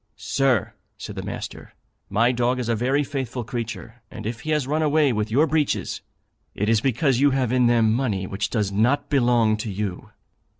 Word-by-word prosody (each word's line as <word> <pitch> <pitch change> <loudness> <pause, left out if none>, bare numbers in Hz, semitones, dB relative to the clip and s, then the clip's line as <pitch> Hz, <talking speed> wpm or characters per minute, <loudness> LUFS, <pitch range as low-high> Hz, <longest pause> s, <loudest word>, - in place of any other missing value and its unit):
'Sir,' 135 -7 0 0.2
said - - -8
the - - -4
master, - - -7 0.3
'my 115 +4 +3
dog 125 +1 0
is 125 - -3
a 115 - +2
very 130 +6 +1
faithful 130 -3 -4
creature; 115 -1 -6
and 110 - -9
if 115 +1 -4
he 155 - -7
has 150 -3 +1
run 150 +4 0
away 150 -3 +3
with 105 0 -1
your 135 +8 +3
breeches, 155 -2 -1 0.5
it 105 - -1
is 110 -1 +3
because 130 0 +1
you 145 +1 +5
have 130 -3 0
in 125 -1 +3
them 115 -2 +3
money 110 -7 -1
which 95 +2 -3
does 105 -4 -1
not 125 +10 +1
belong 120 -5 +3
to 110 0 -4
you.' 100 -2 -4
120 Hz, 195 wpm, -23 LUFS, 110-135 Hz, 0.5 s, you